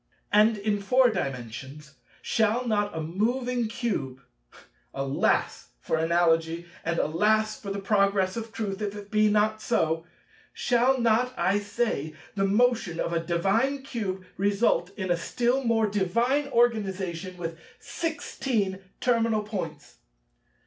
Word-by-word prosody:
And 215 +1 +5
in 205 0 -1
Four 250 +5 +4
Dimensions 135 - -5 0.3
shall 225 +3 +1
not 205 -5 0
a - - -2
moving 240 +8 -1
Cube—alas, 135 - -3
for - - -1
Analogy, 165 0 +2 0.2
and 170 0 -1
alas 215 +8 +1
for 200 - -6
the 195 - -3
Progress 200 -1 +2
of 225 -1 -5
Truth, 205 -3 -4
if 205 -1 -3
it 205 -1 -9
be 215 -1 +4
not 215 +1 +2
so—shall 235 - -1
not, 235 +2 +2
I 190 +4 +2
say, 205 -8 -2 0.2
the 195 -1 +1
motion 220 -4 +2
of 170 - -1
a 165 - +2
divine 210 +11 +1
Cube 195 -8 -4
result 200 -3 +2
in 190 -3 -2
a - - +4
still 245 +8 0
more 225 -1 +3
divine 230 +8 +1
Organization 195 -7 0
with 165 -1 -5 0.2
sixteen 240 - -2 0.2
terminal 230 -3 +2
points? 170 -8 -6
205 Hz, 125 wpm, -27 LUFS, 170-230 Hz, 0.3 s, And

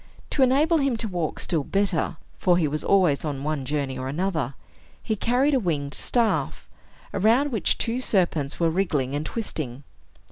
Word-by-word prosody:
To 280 - 0
enable 295 +6 +4
him 275 -4 +1
to 225 - 0
walk 175 -5 -2
still 160 -5 -1
better 195 -2 0 0.2
(for 175 -2 +3
he 165 -4 +2
was 150 +1 -2
always 180 -8 +3
on 140 -3 -3
one 150 -3 -2
journey 140 -2 -2
or 130 - -4
another) 155 -3 -2 0.5
he 220 - -1
carried 250 +7 +2
a 265 - +4
winged 145 - -2
staff, 235 -3 0 0.5
around 230 +9 +3
which 220 -5 +1
two 240 +2 -1
serpents 170 - 0
were 165 -1 +2
wriggling 155 -8 0
and 145 +1 -1
twisting. 145 - -5
175 Hz, 170 wpm, -25 LUFS, 145-230 Hz, 0.5 s, enable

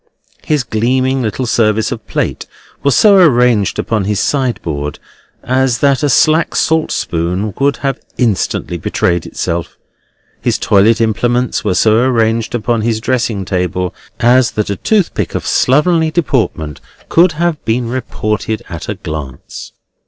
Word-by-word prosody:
His 150 -4 0
gleaming 130 +4 0
little 120 +2 -2
service 110 -2 +1
of - - -6
plate - - -3 0.3
was 140 -1 +2
so 205 -2 +6
arranged 125 - +3
upon 110 -4 -1
his 105 0 -1
sideboard 110 - -2 0.5
as 130 -1 +1
that 140 +2 +2
a 145 - +1
slack 155 +5 +3
salt 160 0 +1
spoon 90 +5 -2
would 140 0 +2
have 135 -1 -1 0.2
instantly 100 -6 -1
betrayed 85 +1 -1
itself; 85 -1 -4 0.6
his - - 0
toilet 110 +3 +3
implements 120 +2 0
were 90 - 0
so 110 +4 +3
arranged 115 -2 +1
upon 115 0 0
his 110 0 0
dressing 115 -5 -1
table 90 -1 -2 0.3
as 120 +1 +4
that 105 -1 -2
a - - -1
toothpick 205 - 0
of - - -3
slovenly 160 +4 +2
deportment 120 - -1 0.3
could 175 +3 +4
have 165 0 -1
been 115 +2 -1
reported 110 -3 -3
at 85 -3 -7
a - - -2
glance. 75 -4 -7
115 Hz, 140 wpm, -14 LUFS, 100-130 Hz, 0.6 s, so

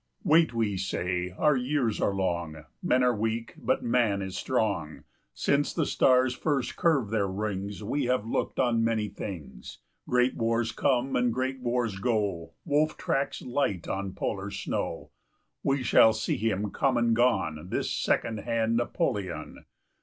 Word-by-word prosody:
] - - -37
Wait, 160 -1 +4
we 110 -4 -1
say; 90 -1 -2
our 150 -2 +4
years 125 -3 0
are 100 - +1
long; 85 -5 -2 0.2
Men 125 0 +2
are 125 -1 +3
weak, 115 +2 -2
but - - -1
Man 115 -4 +2
is 95 -1 -6
strong; 95 - -1 0.3
Since 140 - 0
the 160 - +1
stars 130 -1 +3
first 135 -1 -1
curved 140 -11 +2
their 105 -3 +1
rings, 100 0 -3
15 105 - -7
We 140 +3 0
have 125 -3 +1
looked 115 - -2
on 120 -3 +2
many 110 -2 0
things; 70 - -8 0.3
Great 125 +1 +3
wars 115 0 0
come 130 0 +1
and 125 -1 +2
great 130 +2 -2
wars 120 -5 -1
go, 100 -7 -1
Wolf 155 0 +1
tracks 160 -6 -1
light 120 -9 -1
on 95 -1 -3
polar - - -3
snow; - - -4 0.5
We 135 -1 0
shall 110 -2 +6
see 110 - -1
him 105 -2 -1
come 135 -3 +1
and 120 -1 +3
gone, 95 -10 +1
This - - -1
second 110 -2 0
hand 115 +1 0
Napoleon. 110 - -2
115 Hz, 160 wpm, -28 LUFS, 100-125 Hz, 0.5 s, shall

